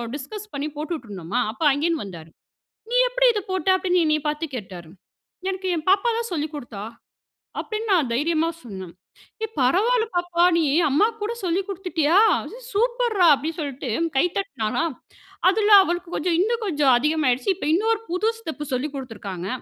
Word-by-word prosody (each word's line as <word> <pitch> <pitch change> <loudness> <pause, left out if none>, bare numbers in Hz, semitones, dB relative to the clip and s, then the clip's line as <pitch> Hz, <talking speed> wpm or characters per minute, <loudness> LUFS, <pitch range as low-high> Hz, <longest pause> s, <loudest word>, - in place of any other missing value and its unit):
Discuss 420 +10 -8
பண்ணி 280 +1 -3
போட்டுட்டு 305 -4 -4
இருந்தோமா, 185 -2 -3
அப்ப 250 - -17
அங்கேந்து 310 +3 0
வந்தாரு. 170 -5 -10 0.6
"நீ - - +1
எப்புடி - - +2
இத 420 - -1
போட்ட" 375 0 -1
அப்டீன்னு 360 -1 +1
என்ன 305 -1 +3
பாத்து 300 +2 -2
கேட்டாரு. 180 -7 -9 0.6
"எனக்கு 380 0 -3
என் 310 - -4
பாப்பா 395 +5 +3
தான் 465 -2 -4
சொல்லிக் 310 -1 -3
குடுத்தா" 235 -8 -7 0.8
அப்டீன்னு 435 0 -4
நான் 310 -10 +2
தைரியமா 320 +5 +1
சொன்னேன். 190 -6 -9 0.5
"ஏய், 445 - -5
பரவால்ல 440 - +3
பாப்பா, 350 0 +2
நீ 330 - +2 0.3
அம்மாக்கு 430 +11 +2
கூட 450 +3 -2
சொல்லி 360 +2 +1
குடுத்துட்டியா? 350 -3 +1 0.5
சூப்பர் 475 +1 +1
ரா!" 350 - +7
அப்படீன்னு 310 +4 -4
சொல்ட்டு 275 -3 -4 0.3
கை 310 - +4
தட்டினாரா. 335 - -2 0.7
அதில 425 +1 +1
அவளுக்கு 350 0 -3
கொஞ்சம் 335 +1 0
இன்னும் 455 +3 0
கொஞ்சம் 290 -7 +3
அதிகமாயிடுச்சு. 285 -1 +1
இப்போ, 345 - -3
இன்னொரு 440 +4 +1
புது 365 +6 +1
ஸ்டெப்பு 315 -7 -6
சொல்லிக் 275 +3 -3
குடுத்திருக்காங்க. 205 -8 -6
330 Hz, 155 wpm, -23 LUFS, 270-395 Hz, 0.8 s, ரா